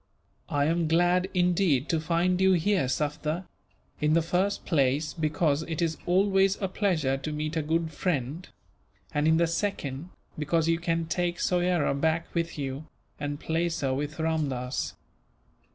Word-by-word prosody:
"I 145 0 +1
am 165 +1 +1
glad, 175 +3 +3
indeed, 175 -6 +2
to 165 - +2
find 175 +3 +1
you 190 0 +5
here, 185 -3 +2
Sufder; 150 +5 -2 0.5
in 150 +1 +2
the 165 0 +3
first 180 +4 0
place, 145 -1 +1
because 155 -2 +1
it 160 -1 -4
is 165 -2 0
always 195 +1 +3
a 195 - 0
pleasure 170 -9 0
to 155 +3 -5
meet 155 +1 -3
a 160 - +1
good 160 +1 -1
friend; 150 0 -2 0.7
and 150 +1 +1
in 160 0 +5
the 170 - +4
second, 165 -4 -3 0.3
because 160 +2 +1
you 165 0 +2
can 165 -1 0
take 175 +1 -1
Soyera 175 -4 +1
back 160 +4 0
with 165 -2 -2
you, 140 +2 -4 0.3
and 145 0 -3
place 165 +1 -1
her 135 -2 +1
with 145 +3 -3
Ramdass." 135 - -2
160 Hz, 155 wpm, -27 LUFS, 150-175 Hz, 0.7 s, you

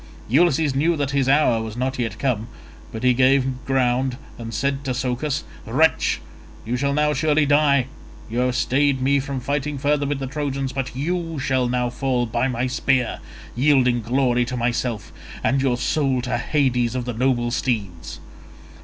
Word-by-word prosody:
Ulysses 150 +1 +3
knew 160 +5 +1
that 140 -2 -1
his 135 -1 +1
hour 135 -5 +3
was 110 0 -6
not 130 +1 -2
yet 115 -2 -2
come, 115 -5 -1 0.4
but 110 +1 -6
he 125 0 +5
gave 130 0 +2
ground 130 -1 +1 0.2
and 115 -1 -6
said 140 +5 -1
to 130 -2 -2
Socus, 130 +3 -2 0.2
"Wretch, 150 +8 +2 0.5
you 120 +3 -1
shall 140 +2 0
now 150 0 +2
surely 150 +1 +2
die. 145 -2 +3 0.4
You 115 +2 -3
have 125 0 +1
stayed 140 +1 +2
me 140 +2 +2
from 135 0 -4
fighting 145 +2 -2
further 145 +1 +1
with 145 0 -1
the 135 - -4
Trojans, 135 -1 -3
but 135 -2 -4
you 165 +3 -2
shall 130 -2 0
now 125 -1 0
fall 125 -1 0
by 120 +3 0
my 125 -1 -1
spear, 130 -1 0 0.4
yielding 125 -2 +3
glory 125 +1 +1
to 125 +1 -4
myself, 120 -2 -2 0.3
and 135 0 +2
your 130 -3 +1
soul 135 +1 0
to 125 - -1
Hades 125 -5 +1
of 125 -1 -2
the 125 - -3
noble 120 0 0
steeds." 105 -10 -3
130 Hz, 170 wpm, -22 LUFS, 125-140 Hz, 0.5 s, he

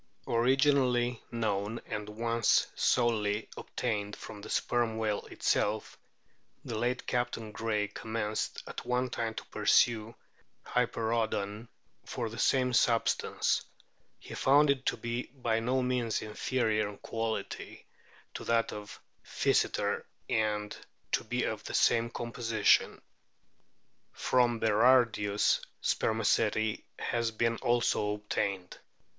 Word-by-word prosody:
Originally 125 -1 +2
known, 110 -2 -2
and 105 0 -5
once 115 +1 +2
solely 110 -3 +1
obtained, 105 -4 -3
from 105 - -10
the 110 - -9
Sperm 120 -2 0
whale 110 -2 -1
itself, 105 +1 0 0.7
the 115 - -4
late 120 +3 -1
Captain 120 -3 -2
Gray 105 -2 -1
commenced 110 0 -3
at - - -7
one 125 0 0
time 115 -2 -2
to - - -6
pursue 115 -1 +2 0.5
Hyperoodon 115 -3 -1 0.4
for 115 -3 -4
the 115 - -7
same 130 -2 +2
sub 115 -1 +3
stance; - - 0 0.5
he - - -11
found 145 +2 +5
it 135 -1 -2
to - - +1
be 120 +1 -3
by 115 -4 0
no 125 +3 0
means 125 -3 0
inferior 110 -1 0
in 100 - -10
quality 115 -3 -4 0.5
to - - -6
that 115 0 +1
of 105 +1 -8 0.2
Physeter, - - +1 0.2
and 105 -1 0 0.4
to - - +1
be - - -1
of - - -3
the - - -4
same 115 0 +3
composition. 115 -2 +1 1.1
From 120 -2 +2
Berardius 110 -2 +3 0.2
spermaceti 110 0 +1
has 115 -1 -1
been 115 +1 0
also 120 -3 +1
obtained. 100 -3 -3
115 Hz, 115 wpm, -31 LUFS, 105-120 Hz, 1.1 s, found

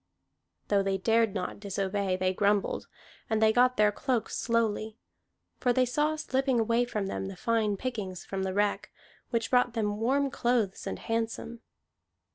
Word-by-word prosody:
Though 200 -1 +4
they 195 0 0
dared 225 +1 +2
not 180 - -3
disobey, 195 -1 -1
they 185 0 +1
grumbled, 200 +1 +1 0.4
and 220 -1 +1
they 220 0 +4
got 250 +1 +4
their 210 0 +5
cloaks 250 0 -1
slowly. 220 -2 0 0.6
For 245 -1 +2
they 255 +1 +3
saw 295 +5 +1
slipping 265 -4 0
away 230 +2 +2
from 215 -4 -3
them 195 0 -3
the 195 - -7
fine 220 -2 +1
pickings 200 -7 -4
from 195 -1 -4
the 190 0 -2
wreck, 205 0 0 0.4
which 230 -1 -1
brought 245 -1 +3
them 210 -2 -1
warm 270 +4 +1
clothes 235 -5 0
and - - -3
handsome. 230 0 -3
220 Hz, 160 wpm, -29 LUFS, 200-245 Hz, 0.6 s, their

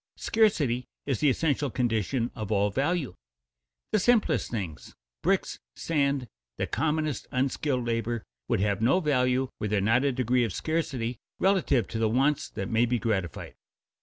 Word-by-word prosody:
_ - - -21
Scarcity 145 - +2 0.2
is 135 -5 -1
the 150 - +4
essential 145 0 +1
condition 120 0 0
of 110 -1 -5
all 100 0 +2
value. 140 - 0 0.8
The 215 - +3
simplest 235 +2 +2
things 95 -10 -5 0.3
bricks, - - 0 0.2
sand, 140 -5 0 0.3
the - - 0
commonest 150 0 -1
unskilled 130 -1 0
labor 115 -1 -1 0.2
would - - +1
have 100 0 0
no 130 +11 +4
value 130 -5 +1
were 105 - -1
there 105 0 +1
not 115 +6 +3
a 140 - +2
degree 125 -1 +1
of 115 - -2
scarcity 130 -8 -2 0.2
relative 170 - +2
to 110 - -3
the 110 -1 +2
wants 135 +5 +1
that 95 - -4
may 115 +2 +2
be 120 +1 +1
gratified. 100 - -2
125 Hz, 160 wpm, -28 LUFS, 115-145 Hz, 0.8 s, the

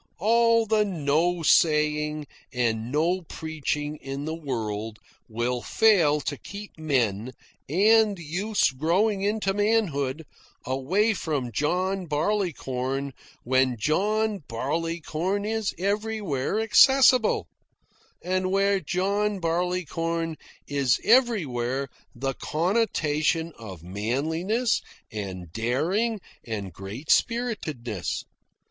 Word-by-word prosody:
All 230 +3 +4
the 215 0 +3
no 170 -1 0
saying 150 -1 +3 0.3
and 115 -2 -1
no 170 +6 +1
preaching 155 -2 -4
in 135 +1 -6
the 160 - -3
world 110 -8 -4 0.3
will 120 +2 -1
fail 170 - +3
to 145 +1 -3
keep 205 +6 -9
men, 130 -7 0 0.4
and 210 +4 +4
youths 180 +6 0
growing 185 +9 +1
into 205 -1 0
manhood, 165 -9 0 0.4
away 175 - +1
from 145 - -2
John 180 - -1
Barleycorn 140 -6 -1 0.3
when 130 0 +2
John 210 - +1
Barleycorn 165 - -2
is 220 -1 -1
everywhere 200 -5 -1
accessible, 260 +3 +5 0.8
and 185 +1 0
where 195 +1 +2
John 200 +5 0
Barleycorn 165 -1 -1 0.3
is 140 -4 +1
everywhere 140 - +2 0.3
the 135 0 -2
connotation 165 - 0
of 95 -7 -10
manliness, 160 - -1 0.3
and 95 -5 -6
daring, 170 - 0 0.2
and 100 -5 -5
great 100 - -5
spiritedness. 155 - -1
160 Hz, 95 wpm, -26 LUFS, 135-200 Hz, 0.8 s, accessible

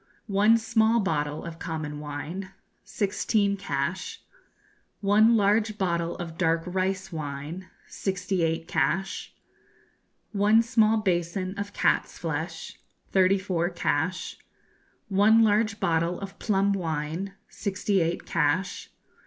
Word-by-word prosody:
One 210 +2 +4
small 225 0 +2
bottle 150 -7 -1
of 165 -1 -8
common 155 -3 -4
wine 150 +6 -5 0.3
sixteen 200 0 0
cash. 170 -2 -3 0.8
One 215 +3 +5
large 210 +1 +2
bottle 170 -3 -1
of 165 -1 -7
dark 165 -2 +2
rice 190 +1 -2
wine 155 +3 -5 0.2
sixty 190 -1 -2
eight 165 0 0
cash. 195 +2 -1 1.0
One 210 +2 +4
small 225 -2 +3
basin 185 -1 -1
of 205 0 -4
cat's - - +1
flesh 165 +1 -4 0.3
thirty 190 0 +4
four 180 -3 -1
cash. 175 0 -1 0.7
One 215 +3 +5
large 215 0 +2
bottle 170 +1 +1
of 195 -1 -8
plum 200 -2 +2
wine 165 +2 -3
sixty 200 -1 -1
eight 165 +1 -1
cash. 165 +5 0
190 Hz, 110 wpm, -27 LUFS, 165-205 Hz, 1.0 s, One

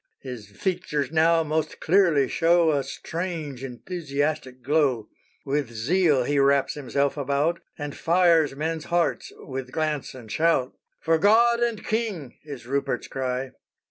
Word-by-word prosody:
_" - - -39
His 125 -6 -7
features 150 - -2
now 165 +1 +4
most 155 0 -2
clearly 165 -6 +3
show 165 +3 +3
A 140 -2 +1
strange, 155 -1 -5
enthusiastic 140 -1 -3
glow. 135 -5 +1 0.4
With 140 -2 -1
zeal 140 +5 +2
he 145 +3 +1
wraps 140 0 +3
himself 140 0 -1
about, 145 +4 0 0.2
And 145 -2 -5
fires 165 -4 +3
men's 160 +2 -3
hearts 170 -1 0
with 130 -1 -7
glance 155 -4 -2
and 115 -4 -11
shout. 160 -6 +1 0.3
"For 165 0 +2
God 235 +5 +5
and 235 -3 -1
king," 210 - -2
is 140 -5 -9
Rupert's 135 -1 -2
cry. 130 0 -3
150 Hz, 140 wpm, -25 LUFS, 135-170 Hz, 0.4 s, God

